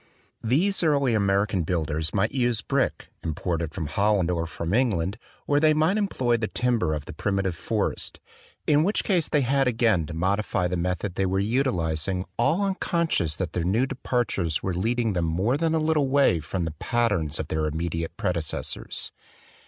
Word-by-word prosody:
These 165 Hz, -, +1 dB
early 140 Hz, -6 st, +2 dB
American 100 Hz, -2 st, +2 dB
builders 80 Hz, -2 st, -1 dB
might 105 Hz, +2 st, +1 dB
use 120 Hz, -4 st, 0 dB
brick, 135 Hz, -1 st, -1 dB
imported 85 Hz, 0 st, -2 dB
from 85 Hz, -, -3 dB
Holland 100 Hz, +2 st, +1 dB
or 85 Hz, -1 st, -1 dB
from 85 Hz, +1 st, -4 dB
England, 100 Hz, -7 st, +1 dB, 0.3 s
or 145 Hz, 0 st, +3 dB
they 155 Hz, 0 st, +4 dB
might 160 Hz, +7 st, +2 dB
employ 130 Hz, -, +1 dB
the 110 Hz, -2 st, -2 dB
timber 115 Hz, -12 st, 0 dB
of 75 Hz, -1 st, -5 dB
the -, -, -8 dB
primitive 100 Hz, -2 st, -1 dB
forest, -, -, -2 dB, 0.5 s
hi 150 Hz, -, +5 dB
which 180 Hz, +8 st, +2 dB
case 175 Hz, -6 st, +1 dB
they 150 Hz, -, +2 dB
had 135 Hz, +1 st, +2 dB
again 110 Hz, -9 st, +2 dB
to 85 Hz, -, -6 dB
modify 95 Hz, +1 st, 0 dB
the 90 Hz, -, -2 dB
method 90 Hz, +2 st, -2 dB
they 95 Hz, +1 st, 0 dB
were 95 Hz, +1 st, 0 dB
utilizing 95 Hz, -, 0 dB
all 155 Hz, +11 st, +2 dB
unconscious 170 Hz, -, 0 dB
that 90 Hz, 0 st, -4 dB
their 85 Hz, -, -1 dB
new 105 Hz, +9 st, +2 dB
departures 120 Hz, -, -1 dB
were 95 Hz, -, -1 dB
leading 115 Hz, +4 st, 0 dB
them 85 Hz, -2 st, 0 dB
more 95 Hz, +10 st, +1 dB
than 160 Hz, +2 st, +1 dB
a -, -, +2 dB
little 155 Hz, -2 st, +2 dB
way 135 Hz, -10 st, +3 dB
from 85 Hz, +3 st, -3 dB
the 80 Hz, -, -3 dB
patterns 105 Hz, -11 st, 0 dB
of 80 Hz, -, -4 dB
their 80 Hz, 0 st, 0 dB
immediate 80 Hz, +1 st, -3 dB
predecessors. 90 Hz, -8 st, -3 dB
100 Hz, 175 wpm, -25 LUFS, 85-130 Hz, 0.5 s, hi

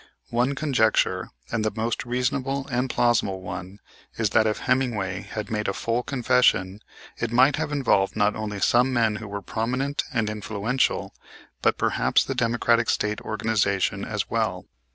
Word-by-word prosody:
One 125 Hz, +4 st, +1 dB
conjecture, 130 Hz, -7 st, +1 dB, 0.2 s
and 115 Hz, -, 0 dB
the 110 Hz, -, +2 dB
most 115 Hz, +2 st, -2 dB
reasonable 135 Hz, +2 st, -1 dB
and 125 Hz, +1 st, 0 dB
plausible 115 Hz, -6 st, +1 dB
one, 95 Hz, +1 st, -7 dB, 0.4 s
is 110 Hz, -3 st, 0 dB
that 110 Hz, 0 st, +4 dB
if 105 Hz, -, -1 dB
Hemmingway 110 Hz, -8 st, 0 dB
had 105 Hz, -1 st, -6 dB
made 105 Hz, -1 st, -1 dB
a 100 Hz, -, 0 dB
full 115 Hz, +1 st, -1 dB
confession 125 Hz, -7 st, +2 dB, 0.4 s
it 120 Hz, -, -2 dB
might 130 Hz, +4 st, +4 dB
have 145 Hz, -, -2 dB
involved 115 Hz, -9 st, +2 dB
not 105 Hz, -1 st, +2 dB
only 105 Hz, -2 st, -4 dB
some 125 Hz, +2 st, +3 dB
men 115 Hz, -4 st, +2 dB
who 110 Hz, -, -8 dB
were 100 Hz, 0 st, -6 dB
prominent 125 Hz, +8 st, -1 dB
and 115 Hz, -3 st, 0 dB
influential, 105 Hz, +4 st, -1 dB, 0.5 s
but -, -, +2 dB
perhaps -, -, +2 dB
the -, -, -3 dB
Democratic 115 Hz, 0 st, +2 dB
State 105 Hz, 0 st, 0 dB
organization 105 Hz, -3 st, 0 dB
as -, -, -3 dB
well. -, -, -1 dB
115 Hz, 155 wpm, -25 LUFS, 105-125 Hz, 0.5 s, that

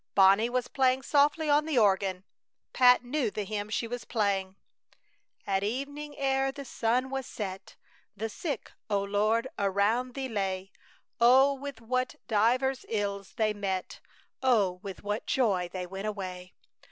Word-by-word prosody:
Bonnie 195 Hz, +4 st, +6 dB
was 250 Hz, 0 st, -1 dB
playing 260 Hz, 0 st, +2 dB
softly 295 Hz, +3 st, +3 dB
on 295 Hz, +1 st, +3 dB
the 305 Hz, -5 st, 0 dB
organ. 195 Hz, -3 st, +2 dB, 0.5 s
Pat 250 Hz, -1 st, +6 dB
knew 250 Hz, -1 st, -1 dB
the 210 Hz, 0 st, -4 dB
hymn 205 Hz, +1 st, -4 dB
she 230 Hz, +2 st, -1 dB
was 245 Hz, +1 st, -5 dB
playing: 195 Hz, -5 st, -1 dB, 0.9 s
At 195 Hz, -1 st, 0 dB
evening, 285 Hz, +6 st, -4 dB
ere 270 Hz, -1 st, +1 dB
the 280 Hz, 0 st, -8 dB
sun 250 Hz, +2 st, 0 dB
was 270 Hz, -2 st, -3 dB
set, 190 Hz, -3 st, -6 dB, 0.4 s
The 220 Hz, +3 st, -2 dB
sick, 275 Hz, +4 st, -5 dB, 0.2 s
O 200 Hz, -1 st, +1 dB
Lord! 215 Hz, +4 st, +1 dB
around 205 Hz, +6 st, +1 dB
Thee 270 Hz, -1 st, -3 dB
lay; 195 Hz, -4 st, -3 dB, 0.5 s
Oh, 260 Hz, +4 st, +6 dB
with 275 Hz, -3 st, -7 dB
what 255 Hz, +2 st, -1 dB
divers 250 Hz, +5 st, +2 dB
ills 200 Hz, -3 st, -3 dB
they 215 Hz, -2 st, +1 dB
met, 195 Hz, -2 st, -3 dB, 0.4 s
Oh, 210 Hz, -9 st, +2 dB
with 195 Hz, -1 st, -8 dB
what 205 Hz, +2 st, -3 dB
joy 195 Hz, -9 st, +1 dB
they 185 Hz, -1 st, -4 dB
went 195 Hz, +3 st, -5 dB
away! 185 Hz, -3 st, -6 dB
225 Hz, 150 wpm, -29 LUFS, 200-260 Hz, 0.9 s, Bonnie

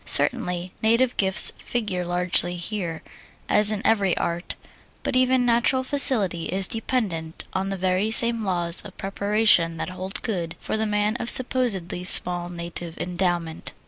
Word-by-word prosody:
Certainly, 180 Hz, -8 st, 0 dB
native 230 Hz, +3 st, +1 dB
gifts 190 Hz, 0 st, +5 dB
figure 205 Hz, -7 st, -4 dB
largely 175 Hz, 0 st, +1 dB
here, 175 Hz, -2 st, -5 dB, 0.4 s
as 210 Hz, 0 st, +4 dB
in 215 Hz, -1 st, -5 dB
every 200 Hz, -5 st, +1 dB
art, 170 Hz, +1 st, -4 dB, 0.5 s
but -, -, -3 dB
even 255 Hz, 0 st, +2 dB
natural 245 Hz, +2 st, +1 dB
facility 225 Hz, -, +3 dB
is 190 Hz, +1 st, -1 dB
dependent 200 Hz, -9 st, -4 dB
on 190 Hz, +1 st, -3 dB
the 195 Hz, -, -4 dB
very 185 Hz, +3 st, -1 dB
same 230 Hz, 0 st, +3 dB
laws 175 Hz, -3 st, +3 dB
of -, -, -13 dB
preparation 200 Hz, -4 st, +1 dB
that -, -, -5 dB
hold 185 Hz, +1 st, -5 dB
good 170 Hz, -6 st, -4 dB
for -, -, -4 dB
the 220 Hz, 0 st, -2 dB
man 210 Hz, +2 st, -1 dB
of 235 Hz, -, -4 dB
supposedly 230 Hz, -9 st, +1 dB
small 175 Hz, -1 st, +4 dB
native 170 Hz, -1 st, -7 dB
endowment. 175 Hz, -2 st, -3 dB
190 Hz, 145 wpm, -22 LUFS, 175-225 Hz, 0.5 s, gifts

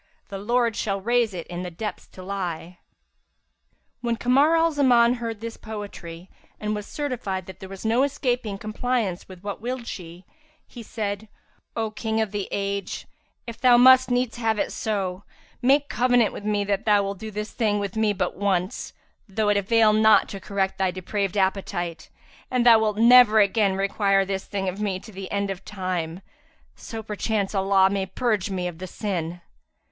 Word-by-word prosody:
* -, -, -40 dB
The 195 Hz, -, -6 dB
Lord 235 Hz, +2 st, +1 dB
shall 200 Hz, -2 st, -1 dB
raise 235 Hz, +2 st, +1 dB
it 175 Hz, -3 st, -6 dB
in 175 Hz, 0 st, -6 dB
the 180 Hz, -, -4 dB
depths 210 Hz, +5 st, -6 dB
to 185 Hz, -, -12 dB
lie.'"[FN#346] 180 Hz, -3 st, -4 dB, 1.3 s
When 235 Hz, -1 st, 0 dB
Kamar 275 Hz, +7 st, +3 dB
al 330 Hz, 0 st, +3 dB
Zaman 245 Hz, -5 st, +4 dB
heard -, -, -2 dB
her 230 Hz, -2 st, -3 dB
quote -, -, -25 dB
this 230 Hz, 0 st, -6 dB
poetry, 195 Hz, -5 st, -8 dB, 0.3 s
and 210 Hz, 0 st, -2 dB
was 210 Hz, -1 st, -5 dB
certified 240 Hz, -, -3 dB
that 190 Hz, 0 st, -11 dB
there 190 Hz, -, -9 dB
was 195 Hz, +2 st, -9 dB
no 230 Hz, +3 st, +3 dB
escaping 245 Hz, -6 st, -1 dB
compliance 215 Hz, -2 st, -2 dB
with 185 Hz, 0 st, -12 dB
what 205 Hz, 0 st, -5 dB
willed 245 Hz, +1 st, -4 dB
she, 175 Hz, -3 st, -8 dB, 0.4 s
he 240 Hz, -, -11 dB
said, 215 Hz, -1 st, -4 dB, 0.5 s
"O 225 Hz, -1 st, -2 dB
King 220 Hz, 0 st, -2 dB
of 220 Hz, -3 st, 0 dB
the 205 Hz, -2 st, -3 dB
age, 200 Hz, -1 st, -3 dB, 0.4 s
if 235 Hz, -2 st, -9 dB
thou 250 Hz, -2 st, +6 dB
must 255 Hz, +1 st, +7 dB
needs 245 Hz, -1 st, 0 dB
have 225 Hz, -2 st, 0 dB
it -, -, -1 dB
so, 195 Hz, -3 st, -2 dB, 0.4 s
make 275 Hz, +3 st, +3 dB
covenant 245 Hz, -4 st, +2 dB
with 205 Hz, -, -8 dB
me 210 Hz, -1 st, +1 dB
that 200 Hz, 0 st, -1 dB
thou 205 Hz, -2 st, +4 dB
wilt 195 Hz, -1 st, -4 dB
do 220 Hz, -, -6 dB
this 210 Hz, +1 st, -5 dB
thing 215 Hz, -3 st, 0 dB
with 200 Hz, -1 st, -3 dB
me 220 Hz, -1 st, +2 dB
but 205 Hz, -, -2 dB
once, 190 Hz, -1 st, -1 dB, 0.4 s
though 210 Hz, +2 st, 0 dB
it 205 Hz, -, +3 dB
avail 215 Hz, +2 st, +4 dB
not 220 Hz, 0 st, +5 dB
to 195 Hz, -, -6 dB
correct 195 Hz, -1 st, -2 dB
thy 190 Hz, -1 st, +2 dB
depraved 195 Hz, +2 st, -3 dB
appetite, 180 Hz, -4 st, -1 dB, 0.4 s
and 250 Hz, -1 st, +1 dB
that 240 Hz, -, +9 dB
thou 225 Hz, -, +7 dB
wilt 215 Hz, -1 st, 0 dB
never 235 Hz, -1 st, +7 dB
again 200 Hz, -1 st, +3 dB
require 195 Hz, 0 st, +2 dB
this 195 Hz, 0 st, -3 dB
thing 195 Hz, -1 st, -3 dB
of 185 Hz, +3 st, -3 dB
me 195 Hz, -3 st, -1 dB
to 220 Hz, -, -13 dB
the 190 Hz, -1 st, -8 dB
end 200 Hz, -1 st, -1 dB
of 190 Hz, 0 st, -7 dB
time; 185 Hz, -3 st, -4 dB, 0.5 s
so 225 Hz, -1 st, -7 dB
perchance 210 Hz, -1 st, -2 dB
shall 195 Hz, -1 st, -1 dB
Allah 195 Hz, 0 st, +4 dB
purge 215 Hz, -2 st, -1 dB
me 185 Hz, -2 st, -2 dB
of 170 Hz, -2 st, -7 dB
the 185 Hz, -, -6 dB
sin." 175 Hz, -4 st, -4 dB
205 Hz, 190 wpm, -24 LUFS, 190-230 Hz, 1.3 s, that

